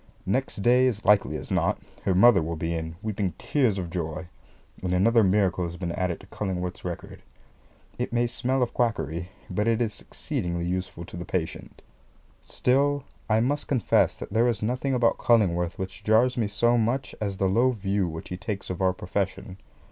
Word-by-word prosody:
Next 100 0 -1
day, 125 +3 +5
as 110 -4 -2
likely 105 0 +4
as - - -9
not, - - +2 0.3
her 95 - +2
mother 100 0 +7
will 85 +1 -3
be 80 +1 -2
in, 80 0 -4
weeping 100 -4 -2
tears 125 -9 +1
of 90 -3 -4
joy; 85 0 -4 0.5
and 90 0 0
another 115 +5 +4
miracle 95 -2 +2
has 85 +1 -6
been 90 -2 -3
added 90 -1 -2
to - - -14
Cullingworth's 95 -3 -4
record. - - -6 0.8
It - - -2
may 120 0 +2
smell 125 +2 0
of 120 - -3
quackery, 85 - -1 0.2
but 105 +4 -1
it 115 0 +2
is 115 -3 -2
exceedingly 85 - -3
useful 90 -1 -3
to 85 - -9
the 85 - -4
patient. 85 -2 -4 0.6
Still 140 +2 +1 0.3
I 110 +1 +4
must 145 +5 0
confess 130 -5 +2
that - - -8
there 115 +2 +4
is 110 -4 -1
nothing 130 +4 0
about 120 -2 +2
Cullingworth 90 -6 +2
which 95 -1 -6
jars 120 +4 +4
me 115 -4 0
so 120 +4 +2
much 120 +4 -1
as 100 -2 -2
the 95 - +1
low 115 +7 +3
view 100 -5 0
which 80 0 -7
he 90 - -4
takes 100 -1 -4
of 90 - -5
our 95 -1 +3
profession. 95 0 -3
100 Hz, 185 wpm, -26 LUFS, 90-120 Hz, 0.8 s, mother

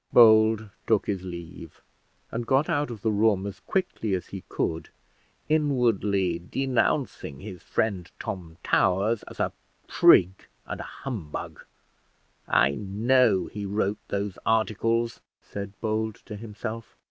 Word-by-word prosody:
Bold 110 -2 +6 0.2
took 110 -3 +3
his 100 -3 -2
leave, 85 -2 -9 0.5
and 115 0 -3
got 135 +3 +3
out 150 -5 0
of 110 -5 -8
the 110 - +2
room 105 -2 +2
as 100 -1 -6
quickly 145 - -1
as 90 - -4
he 95 -2 -7
could, 80 0 -2 0.6
inwardly 115 - +2
denouncing 125 - -1
his 95 -2 -9
friend 95 -6 -1
Tom 85 -3 -6
Towers 100 +5 +2
as - - -11
a - - +1 0.4
prig 95 +2 +5 0.2
and - - -5
a - - -11
humbug. 105 - -5 0.8
"I 70 - +4
know 105 - +2
he 105 - -6
wrote 100 +1 0
those 100 -1 -3
articles," 115 +1 +1 0.2
said 100 0 -8
Bold 110 -1 -1
to 105 - -7
himself. 110 +1 -7
105 Hz, 130 wpm, -26 LUFS, 95-115 Hz, 0.8 s, Bold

